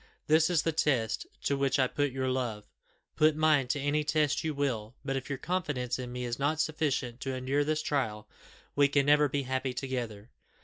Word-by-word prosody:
This 160 +2 +4
is 170 -3 +2
the 165 - +1
test 130 -8 0 0.2
to 140 - +1
which 135 0 +1
I 130 - +4
put 145 +2 -1
your 130 0 -2
love 120 -5 -2 0.5
put 155 0 +4
mine 155 -4 +3
to 140 - -1
any 145 +2 +1
test 150 -1 +1
you 160 - 0
will, 125 -6 -2
but 135 -1 -1
if 135 +1 -4
your 140 - -2
confidence 135 -7 -2
in 125 -1 -5
me 125 0 -4
is 120 +1 -3
not 145 +3 +1
sufficient 145 -6 -1
to 135 -1 -3
endure 130 +3 0
this 155 +1 -1
trial, 110 -7 -1 0.5
we 145 0 +5
can 140 0 +2
never 150 0 +5
be 140 +1 -1
happy 130 0 -2
together." 120 -5 -4
140 Hz, 205 wpm, -30 LUFS, 125-150 Hz, 0.5 s, we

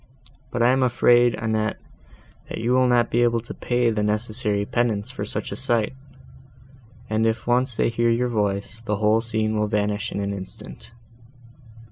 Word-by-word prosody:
But 120 - 0
I 120 - +5
am 130 +1 +2
afraid, 120 -1 +4
Annette, 110 -1 -1 0.7
you 115 +2 -2
will 130 0 +4
not 120 -1 +2
be 120 - +2
able 120 -1 +3
to 120 - -9
pay 120 -1 0
the 105 -1 -1
necessary 105 0 -1
penance 110 -3 -1
for - - -5
such - - -5
a - - -3
sight: 115 0 0 1.1
and, 110 +1 +1
if 110 0 -1
once 125 0 +1
they - - +2
hear 115 0 +1
your 120 +2 +2
voice, 105 -1 -2
the 110 -2 -2
whole 105 +2 +2
scene 110 -1 -1
will 105 - +1
vanish 105 +1 -1
in - - -3
an 100 0 -2
instant." 95 +4 -9
115 Hz, 170 wpm, -23 LUFS, 105-120 Hz, 1.1 s, I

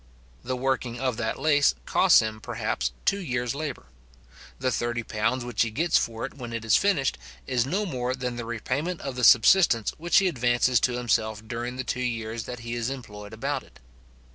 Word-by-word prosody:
The 130 +1 -3
working 130 -2 -1
of 130 -4 -1
that 110 -1 -2
lace 145 - +3
costs - - +5
him, 110 0 -4
perhaps, - - -2
two 200 - +2
years 125 -8 -2
labour. 145 - -5 0.7
The 130 0 0
£30 120 0 -1
which 120 - -1
he 115 - +2
gets 160 +10 0
for 115 0 -3
it - - -8
when 120 -4 -8
it 115 -1 -4
is 110 - +4
finished, 180 -10 +2 0.3
is 125 -1 0
no 195 +8 0
more 130 -6 -2
than 125 -2 -4
the 120 -1 -5
repayment 135 +9 -3
of 135 -2 -5
the 125 - -3
subsistence 120 - +6
which 170 +2 +2
he 195 - +5
advances 120 -4 +2
to 125 +2 0
himself 110 -2 -1
during 120 +2 -4
the 130 - -3
two 125 - -3
years 115 -2 -3
that 125 -1 -7
he 115 0 -5
is 120 0 -2
employed 105 -6 -8
about 135 +5 -2
it. - - -20
125 Hz, 190 wpm, -26 LUFS, 115-135 Hz, 0.7 s, subsistence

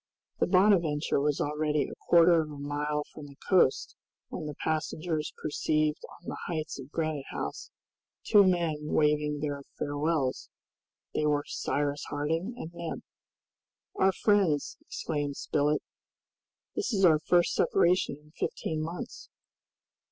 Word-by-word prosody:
The - - +2
"Bonadventure" 175 -8 +3
was 145 0 +1
already 150 0 0
a - - -8 0.2
quarter 170 -1 +6
of 155 - -5
a 145 - -8
mile 145 +1 -2
from 150 -2 -9
the 140 - -14
coast 180 -8 +3 0.3
when 155 - -5
the 150 - -6
passengers 155 +1 -2
perceived 155 0 0
on 175 - -15
the - - -4
heights 155 -4 -3
of 135 0 -9
Granite 155 -3 -2
House - - -5 0.5
two 205 -2 +6
men 170 -5 +2
waving 150 -1 +1
their 145 -2 -2 0.2
farewells; 145 -2 -1 0.6
they 150 - +1
were 145 -1 +2
Cyrus 145 0 -2
Harding 160 +10 -2
and 165 - -6
Neb. 170 -1 -5 0.9
"Our 190 0 +3
friends," 190 -8 +2
exclaimed 145 -3 -3
Spilett, 150 0 0 0.9
"this - - -1
is 195 -4 +3
our 160 -3 +6
first 175 +2 +3
separation 180 -4 +2
in 150 - -21
fifteen 155 -1 -3
months." 175 +10 -6
155 Hz, 135 wpm, -29 LUFS, 145-170 Hz, 0.9 s, quarter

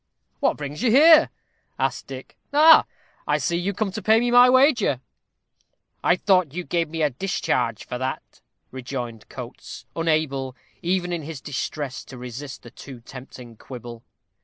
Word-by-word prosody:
"What - - +1
brings 145 +3 -6
you 245 - +2
here?" 315 +6 +7 0.5
asked - - -2
Dick. - - -9 0.2
"Ah! 310 +2 +7 0.4
I - - +2
see, 170 - -1
you 175 +3 -1
are - - -2
come 210 -1 -1
to 215 - -6
pay 220 +1 +4
me 240 +1 0
my 245 +1 +7
wager." 255 - +3 1.0
"I 180 - +4
thought 180 -5 +1
you 180 - -3
gave 170 -2 -1
me 160 0 -2
a 150 - +2
discharge 125 - -2
for 125 - -5
that," 130 +1 -5 0.3
rejoined 125 -3 -6
Coates, - - -9
unable, 155 -5 -1 0.3
even 175 0 -1
in 170 - -3
his 155 -1 -7
distress, 140 0 -5
to 130 - -11
resist 125 +3 -8
the 120 - -12
too 130 -4 -11
tempting 125 -2 -12
quibble. 120 -2 -10
155 Hz, 160 wpm, -23 LUFS, 130-195 Hz, 1.0 s, here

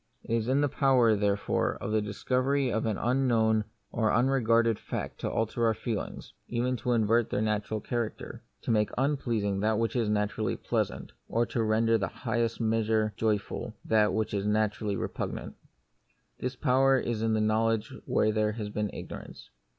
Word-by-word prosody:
It - - -4
is 115 -1 -1
in 135 +3 +3
the 145 - +3
power, 130 -5 +4
therefore, 100 0 0
of 105 - -5
the 110 0 +2
discovery 130 +6 0
of 110 +1 0
an 105 -3 0
unknown 115 -4 +2 0.3
or 110 -2 +1
unregarded 115 -3 +3
fact - - -5
to - - -2
alter 115 +1 -1
our 110 - +2
feelings 110 -2 -5
— - - -45
even 125 +2 0
to 120 +2 0
invert 115 0 +2
their - - -1
natural 105 0 -1
cha 120 - -3
racter; 115 -2 -4 0.2
to - - -1
make 105 -2 +2
unpleasing 120 -8 0
that 110 +1 +1
which 115 +2 -1
is 115 -4 +1
na 105 0 +2
turally 105 - -3
pleasant, - - -2 0.2
or 115 +1 +2
to 115 +1 -2
render 110 +1 +2
in 115 - +3
the 95 - +1
highest 115 -1 -2
measure 110 -1 +1
joyful 105 -2 -2
that 105 -2 +3
which 110 +2 -1
is 100 0 -1
naturally 105 -1 0
repug - - -3
nant. - - -7 0.9
This 125 0 -3
power 135 +2 +3
is 120 -3 -2
in 115 0 +1
knowledge 110 0 +1
where 110 - +2
there 105 0 +1
has 105 -2 -5
been 105 0 -1
ignorance. - - -9
110 Hz, 180 wpm, -29 LUFS, 105-120 Hz, 0.9 s, power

